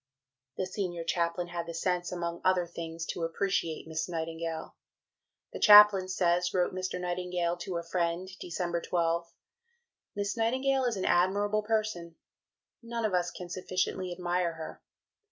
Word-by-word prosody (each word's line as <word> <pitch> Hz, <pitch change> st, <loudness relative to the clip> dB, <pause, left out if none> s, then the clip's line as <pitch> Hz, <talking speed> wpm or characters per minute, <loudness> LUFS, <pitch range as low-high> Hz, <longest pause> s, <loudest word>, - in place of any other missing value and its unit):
The 185 Hz, -, 0 dB
Senior 180 Hz, -3 st, -3 dB
Chaplain 170 Hz, +1 st, -1 dB
had 170 Hz, -1 st, -4 dB
the 170 Hz, -, -5 dB
sense, 175 Hz, +1 st, -1 dB
among 170 Hz, -1 st, -3 dB
other 185 Hz, -1 st, +3 dB
things, 165 Hz, -1 st, -6 dB
to -, -, -6 dB
appreciate 165 Hz, -1 st, -1 dB
Miss 160 Hz, +2 st, -3 dB
Nightingale. 165 Hz, -1 st, -4 dB, 0.8 s
"The -, -, -5 dB
Chaplain 210 Hz, -3 st, +9 dB
says," 180 Hz, -1 st, +1 dB
wrote 180 Hz, 0 st, +2 dB
Mr. 185 Hz, -1 st, -3 dB
Nightingale 180 Hz, -1 st, -1 dB
to 175 Hz, 0 st, -4 dB
a 170 Hz, -, -3 dB
friend 170 Hz, +1 st, -1 dB
(Dec. 175 Hz, -2 st, -3 dB
12), 170 Hz, -1 st, 0 dB, 0.8 s
"'Miss 205 Hz, +1 st, -2 dB
Nightingale 260 Hz, +3 st, +1 dB
is 235 Hz, -4 st, 0 dB
an 190 Hz, -, -2 dB
admirable 205 Hz, +4 st, +2 dB
person; 210 Hz, -6 st, -2 dB, 0.7 s
none 230 Hz, -1 st, -3 dB
of 210 Hz, -, 0 dB
us 175 Hz, -1 st, +1 dB
can 180 Hz, 0 st, -8 dB
sufficiently 185 Hz, +1 st, -2 dB
admire 175 Hz, -1 st, -1 dB
her. 160 Hz, -1 st, -8 dB
180 Hz, 145 wpm, -30 LUFS, 170-190 Hz, 0.8 s, Chaplain